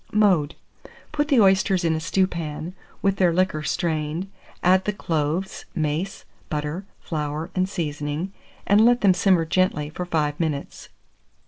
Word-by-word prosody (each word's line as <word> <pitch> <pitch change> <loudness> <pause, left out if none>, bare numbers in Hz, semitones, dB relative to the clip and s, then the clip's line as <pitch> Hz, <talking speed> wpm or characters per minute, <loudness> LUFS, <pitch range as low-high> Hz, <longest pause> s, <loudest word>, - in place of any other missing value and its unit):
Mode. 185 -8 +3 0.6
Put 295 -1 0
the 275 -5 +4
oysters 190 -2 +4
in 165 - +3
a 160 - -1
stewpan, 170 -2 -1 0.3
with 195 0 +2
their 180 -3 +4
liquor 180 -3 +1
strained; 160 +3 -2 0.3
add 185 +1 +4
the 210 - 0
cloves, 165 0 -2
mace, 160 +4 -2 0.2
butter, 150 +6 -3
flour, 155 +2 -4
and 185 0 0
seasoning, 150 +1 -3 0.3
and 205 +2 +5
let 240 +1 +4
them 195 -3 +5
simmer 180 -2 +3
gently 160 -4 +1
for 180 +3 -4
5 150 -3 0
minutes. 150 -4 -3
175 Hz, 140 wpm, -24 LUFS, 155-190 Hz, 0.6 s, and